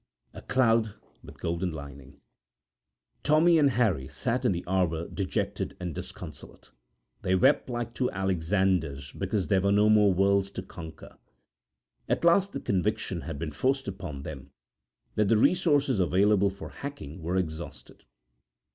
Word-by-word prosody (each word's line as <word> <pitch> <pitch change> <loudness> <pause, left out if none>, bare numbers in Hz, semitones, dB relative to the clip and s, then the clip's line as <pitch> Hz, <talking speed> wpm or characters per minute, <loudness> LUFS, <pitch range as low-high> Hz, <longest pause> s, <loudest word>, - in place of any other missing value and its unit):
A - - -9
Cloud 115 -4 +2 0.3
with - - -13
Golden 85 +2 -2
Lining[edit] 70 -2 -10 1.0
Tommy 160 +3 +4
and 145 -2 +5
Harry 105 - +1
sat 125 +2 -2
in 120 - +4
the 85 -1 -3
arbour 85 -3 0
dejected 95 -7 -3
and 90 -2 -4
disconsolate. - - -10 0.5
They 95 - +1
wept 95 - +3
like 120 -1 -3
two 125 0 0
Alexanders 90 -7 0
because 100 -4 -2
there 95 -2 +3
were 100 +1 +2
no 105 +1 +4
more 105 -2 +5
worlds 100 +1 +2
to 95 - -5
conquer. 80 -4 -11 0.9
At - - 0
last 195 +3 +4
the - - -3
conviction 100 -2 -1
had 80 -2 -6
been 75 +1 -4
forced 135 - 0
upon 90 -8 -6
them 70 0 -8 0.6
that 105 -1 +2
the 110 - +4
resources 145 - +3
available 100 +3 +3
for 100 +1 -9
hacking 85 - -8
were 85 +3 -1
exhausted. 85 -2 -5
95 Hz, 145 wpm, -28 LUFS, 85-115 Hz, 1.0 s, and